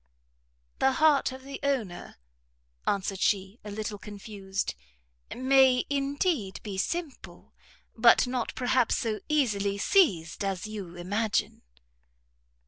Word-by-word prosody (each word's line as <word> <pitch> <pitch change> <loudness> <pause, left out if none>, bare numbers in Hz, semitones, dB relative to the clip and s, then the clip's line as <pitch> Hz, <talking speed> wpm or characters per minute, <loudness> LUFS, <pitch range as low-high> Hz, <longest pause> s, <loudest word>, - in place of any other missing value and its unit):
"The 265 - +3
heart 295 -1 +3
of 260 0 -10
the 275 +1 -7
owner," 245 -11 -2 0.7
answered 195 -1 -1
she, 195 +2 0
a 210 - -7
little 210 0 -5
confused, 200 -2 -5 0.6
"may, 260 0 +4
indeed, 280 - -1
be 195 -3 -5
simple, 335 - -5 0.4
but 235 +2 +6
not, 250 -1 -3
perhaps, 250 -2 +2
so 220 -2 -2
easily 205 -9 +1
seized 200 - +2
as 195 -1 -2
you 200 -5 -7
imagine." 205 +5 -1
220 Hz, 110 wpm, -28 LUFS, 200-265 Hz, 0.7 s, but